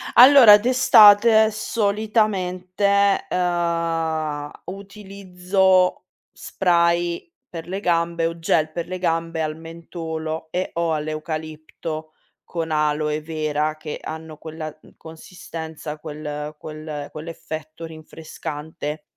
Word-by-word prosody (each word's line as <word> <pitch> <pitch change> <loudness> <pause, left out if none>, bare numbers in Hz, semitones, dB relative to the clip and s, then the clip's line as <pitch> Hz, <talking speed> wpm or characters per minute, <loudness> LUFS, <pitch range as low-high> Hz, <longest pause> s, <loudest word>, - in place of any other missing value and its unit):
Allora 250 -5 +9
d'estate 220 -2 +6
solitamente, 200 -2 0
ehm, 165 -4 -1
utilizzo 190 -1 0 0.3
spray 170 - 0 0.2
per 165 -1 -8
le 190 +2 -4
gambe 170 -2 0
o 165 0 -2
gel 160 -1 +1
per 170 +1 -5
le 185 +1 -4
gambe 165 -2 -1
al 155 0 -2
mentolo 160 -1 -6
e/o 170 -2 -1
all'eucalipto, 155 0 -5 0.3
con 165 -2 -5
aloe 150 0 0
vera 155 -1 -2
che 155 -1 -7
hanno 160 -1 -8
quella, 155 0 -7
mhmm, - - -20
consistenza, 160 -1 -8
quel 150 0 -6
quel 155 -2 -7
quell'effetto 155 0 -8
rinfrescante. 155 -1 -7
165 Hz, 95 wpm, -22 LUFS, 155-185 Hz, 0.3 s, Allora